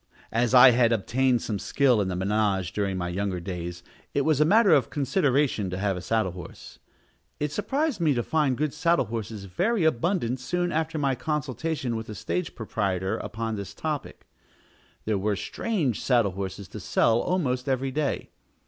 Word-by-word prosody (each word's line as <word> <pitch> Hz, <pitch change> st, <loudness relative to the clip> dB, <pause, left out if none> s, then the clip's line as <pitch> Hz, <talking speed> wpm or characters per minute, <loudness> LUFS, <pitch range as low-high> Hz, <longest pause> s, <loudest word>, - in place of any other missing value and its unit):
As 120 Hz, +2 st, +2 dB
I 125 Hz, +1 st, +10 dB
had 120 Hz, -1 st, +3 dB
obtained 120 Hz, +3 st, +1 dB
some 105 Hz, -3 st, -3 dB
skill 125 Hz, -3 st, +2 dB
in 100 Hz, -, -1 dB
the 90 Hz, -, -2 dB
manège 95 Hz, -1 st, 0 dB
during 100 Hz, -2 st, -1 dB
my 90 Hz, -1 st, -2 dB
younger 95 Hz, 0 st, -2 dB
days, 85 Hz, -1 st, -6 dB, 0.3 s
it 140 Hz, -, +3 dB
was 150 Hz, 0 st, +2 dB
a -, -, +6 dB
matter 205 Hz, +4 st, +5 dB
of 135 Hz, -6 st, +3 dB
consideration 140 Hz, -, +1 dB
to 90 Hz, -, -4 dB
have 100 Hz, 0 st, 0 dB
a 90 Hz, -, -5 dB
saddle 110 Hz, -2 st, 0 dB
horse. 85 Hz, -8 st, -11 dB, 0.6 s
It 150 Hz, 0 st, -1 dB
surprised 270 Hz, -, -1 dB
me 155 Hz, -4 st, +3 dB
to 120 Hz, -, 0 dB
find 145 Hz, -4 st, +1 dB
good 150 Hz, -1 st, -1 dB
saddle 170 Hz, -5 st, +2 dB
horses 110 Hz, -2 st, -5 dB
very 190 Hz, -, 0 dB
abundant 155 Hz, -3 st, +1 dB
soon 175 Hz, +7 st, -1 dB
after 160 Hz, 0 st, -1 dB
my 140 Hz, -2 st, +1 dB
consultation 150 Hz, -2 st, -2 dB
with 110 Hz, 0 st, -5 dB
the 105 Hz, -, -7 dB
stage 110 Hz, -, -3 dB
proprietor 100 Hz, -4 st, -2 dB
upon 110 Hz, 0 st, -4 dB
this 100 Hz, 0 st, -7 dB
topic. 150 Hz, +1 st, -4 dB, 0.8 s
There 105 Hz, -2 st, 0 dB
were 105 Hz, +1 st, 0 dB
strange 155 Hz, -, -2 dB
saddle 120 Hz, -6 st, +2 dB
horses 95 Hz, +1 st, -5 dB
to -, -, -8 dB
sell 115 Hz, 0 st, +2 dB
almost 135 Hz, -8 st, -1 dB
every 135 Hz, 0 st, 0 dB
day. 145 Hz, 0 st, -2 dB
120 Hz, 175 wpm, -26 LUFS, 100-150 Hz, 0.8 s, I